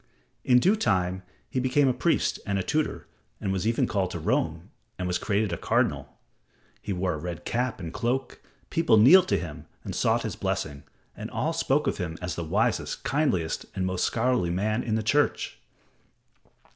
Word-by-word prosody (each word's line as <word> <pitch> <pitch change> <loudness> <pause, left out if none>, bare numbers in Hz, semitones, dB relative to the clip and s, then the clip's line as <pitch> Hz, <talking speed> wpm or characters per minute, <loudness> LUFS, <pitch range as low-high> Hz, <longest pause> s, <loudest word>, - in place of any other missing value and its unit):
In 125 - +5
due 190 - +4
time, 95 - 0 0.3
he 130 - -2
became 130 +2 +3
a 130 - +3
priest 160 +7 +1
and 100 -1 -1
a 95 - -1
tutor 155 - -1 0.3
and 95 - -2
was 95 +2 -1
even 115 - +2
called 95 -3 0
to - - -5
Rome - - -1 0.3
and 90 - -3
was 90 - 0
created 100 -2 0
a - - -2
cardinal. - - 0 0.6
He 105 - -5
wore 90 -1 0
a 75 - -5
red 85 +1 -6
cap 125 -1 -1
and 85 -2 -6
cloak, 125 +2 -2 0.3
people 165 -9 +4
kneeled 170 - +8
to - - +2
him 80 -4 -7 0.2
and - - -5
sought - - +1
his - - -3
blessing, 70 -1 -3 0.3
and - - -6
all - - -1
spoke - - +1
of - - -1
him 85 -2 -3
as 90 -2 -3
the 85 - -4
wisest, 80 - 0
kindliest 95 - 0
and 95 - -1
most 95 -1 -1
scholarly 120 -6 +1
man 105 +6 0
in 110 -3 -1
the 110 - 0
Church. 145 +7 +1
105 Hz, 185 wpm, -27 LUFS, 90-130 Hz, 0.6 s, kneeled